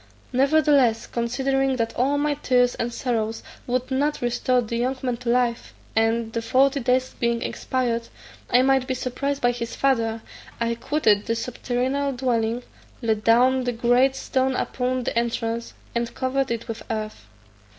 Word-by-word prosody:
Nevertheless, 275 -3 +3
considering 265 +3 0
that 230 -2 -2
all 275 +4 +1
my 295 0 +1
tears 250 -4 +2
and 240 - -3
sorrows 225 -3 -2 0.2
would 255 +1 -1
not 290 +3 +1
restore 245 +1 +1
the 235 -1 -2
young 255 +3 0
man 250 -2 -1
to 245 0 -5
life, 240 -1 0 0.2
and, 225 0 +1
the 230 - -1
forty 270 +4 +3
days 255 +1 +1
being 235 -1 0
expired, 235 -3 -2 0.4
I 245 +1 +5
might 265 -1 +3
be 260 - -1
surprised 275 +3 -3
by 245 - +4
his 235 -1 -5
father, 230 -4 +1 0.4
I 235 0 0
quitted 225 -5 +1
the 230 - +1
subterranean 255 +3 -2
dwelling, 240 -2 0 0.4
laid 220 -2 0
down 250 +3 +4
the 245 - 0
great 245 +3 +3
stone 265 -1 0
upon 255 0 -1
the - - -3
entrance, 235 0 -2 0.2
and 235 0 -1
covered 265 +1 0
it 235 -1 -3
with 225 0 -5
earth. 215 - -4
245 Hz, 160 wpm, -24 LUFS, 230-265 Hz, 0.4 s, I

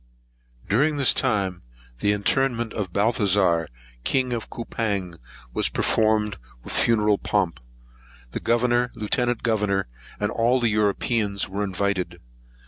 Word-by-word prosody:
During 145 +8 +2
this 140 -3 +4
time, 100 -8 0 0.4
the 105 - +2
interment 120 +2 +1
of 100 -4 -3
Balthazar, 100 -5 +2 0.4
King 130 - +1
of 115 -2 -4
Coupang, 100 -7 -3 0.3
was - - +1
performed 110 -2 +1 0.3
with - - -6
much - - +3
funeral 105 -3 +3
pomp. 90 -10 0 0.7
The - - -3
Governor, 120 +1 +1
Lieutenant 120 +2 -1
Governor, 105 -4 +1 0.3
and 105 - 0
all 120 +3 +2
the 120 -2 +2
Europeans 105 0 0
were 100 +2 -3
invited. 95 -2 -2
105 Hz, 125 wpm, -24 LUFS, 100-120 Hz, 0.7 s, this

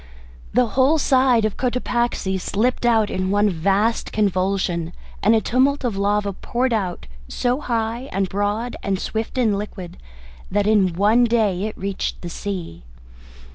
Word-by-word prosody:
The 250 +3 +3
whole 265 +8 +3
side 255 -5 +3
of 215 - -2
Cotopaxi 240 -6 -1
slipped 240 +6 0
out 225 -3 +3
in 185 0 -1
one 205 +1 +3
vast 195 +7 0
convulsion, 185 -4 0 0.3
and 215 +4 +4
a 220 - +3
tumult 265 +5 +1
of 240 -5 -1
lava 200 0 0
poured 245 +6 -1
out 185 - -2 0.2
so 245 - -1
high 235 +1 -2
and 195 -1 0
broad 205 +5 -2
and 195 -1 -1
swift 220 +5 -4
and 225 -5 +2
liquid 190 -4 -7 0.5
that 205 +1 +1
in 205 -4 +3
one 215 +6 +4
day 215 -5 +1
it 215 - -5
reached 195 0 -3
the 175 - -5
sea. 180 - -5
210 Hz, 150 wpm, -21 LUFS, 195-240 Hz, 0.5 s, and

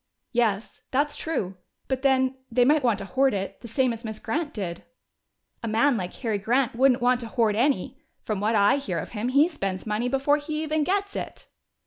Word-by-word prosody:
"Yes, 225 -4 0
that's 290 +3 0
true. 195 - -3 0.3
But 265 -1 -1
then, 260 -1 +3 0.2
they 245 +1 +4
might 300 +3 +4
want 235 -5 +2
to 195 - -6
hoard 265 +2 +2
it, 195 0 -4
the 235 - -8
same 255 +1 +1
as 230 +1 -9
Miss 220 -1 -5
Grant 305 +4 -2
did." 180 - -5 0.8
"A 230 - -4
man 230 +5 +3
like 185 -4 -3
Harry 220 -5 -2
Grant 240 +4 +1
wouldn't 255 0 +3
want 250 0 +4
to 235 - -5
hoard 225 -2 +1
any! 250 -3 0 0.2
From 215 -3 -3
what 220 +2 +1
I 205 +5 +5
hear 200 -11 -3
of 165 - -4
him, 225 +1 -3
he 280 +5 +5
spends 195 - -4
money 220 +3 -1
before 275 +3 +2
he 305 +1 -3
even 310 0 0
gets 400 +4 -1
it." - - -6
245 Hz, 205 wpm, -26 LUFS, 215-280 Hz, 0.8 s, I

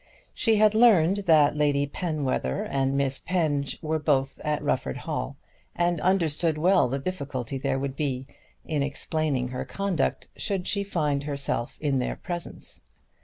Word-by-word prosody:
She 225 -2 +2
had 215 0 +5
learned 205 -4 +4
that 150 -3 +5
Lady 145 -1 +2
Penwether 145 - -2
and 135 0 0
Miss 135 -1 0
Penge 150 -6 -1
were 160 0 0
both 135 -3 0
at 150 -1 -1
Rufford - - -1
Hall, - - -4 0.4
and 175 -2 +1
understood 165 -4 +3
well 180 -4 +4
the 135 - -1
difficulty 140 -5 -4
there 135 0 0
would 135 0 -3
be 135 -3 -2 0.4
in 150 -3 -1
explaining 140 -2 -1
her 130 0 -4
conduct 195 -7 -1
should 195 -3 -2
she 200 0 0
find 150 -7 0
herself 140 -4 -2
in 140 -3 0
their 125 - -2
presence. 175 -1 -4
150 Hz, 150 wpm, -26 LUFS, 135-175 Hz, 0.4 s, had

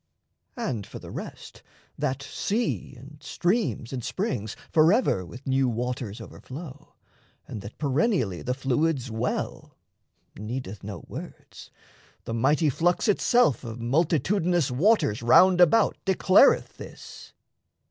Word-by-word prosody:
And 130 - -3
for - - -9
the - - -10
rest, - - -9 0.3
that 140 -1 -2
sea, 210 - -2
and 140 +4 -14
streams, 175 - -1
and 125 -3 -4
springs 120 - -3 0.2
Forever 160 - +3
with 125 +9 -11
new 135 -1 +2
waters 120 -2 -4
overflow, 145 +1 -10 0.5
And 105 - -7
that 100 +2 -10
perennially 140 - 0
the 125 - -2
fluids 135 -1 0
well, 110 +3 -4 0.6
Needeth 105 -2 -6
no 100 0 -7
words - - -10 0.5
the 115 - -5
mighty 145 +6 +2
flux 175 - +1
itself 210 - +3
Of 115 -1 -7
multitudinous 160 - +1
waters 140 - +2
round 180 +10 +6
about 180 +6 +4
Declareth 190 +5 +4
this. - - -11
135 Hz, 115 wpm, -26 LUFS, 120-175 Hz, 0.6 s, round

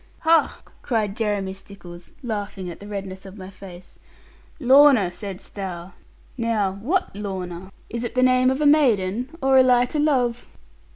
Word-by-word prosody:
'Ha!' 325 0 +2 0.2
cried 215 -5 -1
Jeremy 205 -4 -2
Stickles, 190 -3 -12
laughing 205 -5 -4
at - - -11
the 205 - -11
redness 195 -2 -6
of 195 +1 -11
my 190 0 -9
face 185 -2 -13 0.6
'Lorna, 265 - +6
saidst 195 0 -8
thou; 185 -2 -6 0.5
now 220 -4 0
what 350 - -1
Lorna? 190 -2 -6 0.2
Is 235 0 -4
it 240 0 -5
the 255 - +3
name 255 0 +4
of 265 +3 -1
a - - +2
maiden, 245 -6 +3
or 265 0 +5
a - - +8
light 250 +1 +3
o' - - +1
love?' 250 -5 +1
210 Hz, 160 wpm, -23 LUFS, 190-255 Hz, 0.6 s, a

